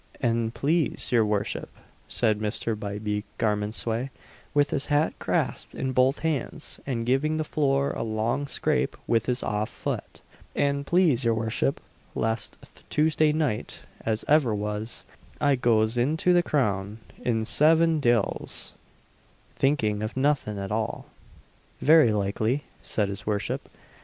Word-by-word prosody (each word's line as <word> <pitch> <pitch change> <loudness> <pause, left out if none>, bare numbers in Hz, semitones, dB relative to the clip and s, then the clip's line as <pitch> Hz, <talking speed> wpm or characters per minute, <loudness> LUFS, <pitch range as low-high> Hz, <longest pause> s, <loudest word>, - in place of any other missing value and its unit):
"An 115 -2 +1
please 150 +6 0
your 120 -2 +5
worship," 105 -1 -1 0.4
said 110 -3 +1
Mr. 110 +1 -1
Bybie 105 0 -3
Garmondsway, 110 +4 -1 0.4
with 145 0 +2
his 140 0 +1
hat 145 +2 +2
grasped - - -1
in 130 0 -2
both 130 +2 +3
hands, 155 0 -3
and 115 -4 -1
giving 140 +5 +1
the 155 - 0
floor 140 -2 +1
a - - -4
long 115 +5 -1
scrape 65 - 0
with 115 0 +1
his 125 0 +1
off 105 0 -1
foot - - -5 0.3
"an 140 0 +1
please 165 -7 +3
your 115 -1 +2
worship, 110 +5 0 0.4
last 110 0 -1 0.3
Tuesday 155 0 +3
night, 150 -8 -2 0.2
as 110 -1 -1
ever 145 -7 +4
was, 105 +2 -3 0.3
I 145 -2 +3
goz 115 -1 +2
into 160 +8 +2
the 175 - +5
Crown, 105 - 0 0.2
in 110 -2 0
Seven 160 +4 +4
Diles, 120 -5 0 0.8
thinking 110 -7 +1
of 110 +4 -4
nothin 135 -6 +1
at 100 0 -4
all." 110 0 -2 0.7
"Very 155 -6 +6
likely," 110 +6 0 0.2
said 105 -2 -1
his 100 +1 -6
worship. 105 -1 -2
120 Hz, 135 wpm, -26 LUFS, 110-145 Hz, 0.8 s, Very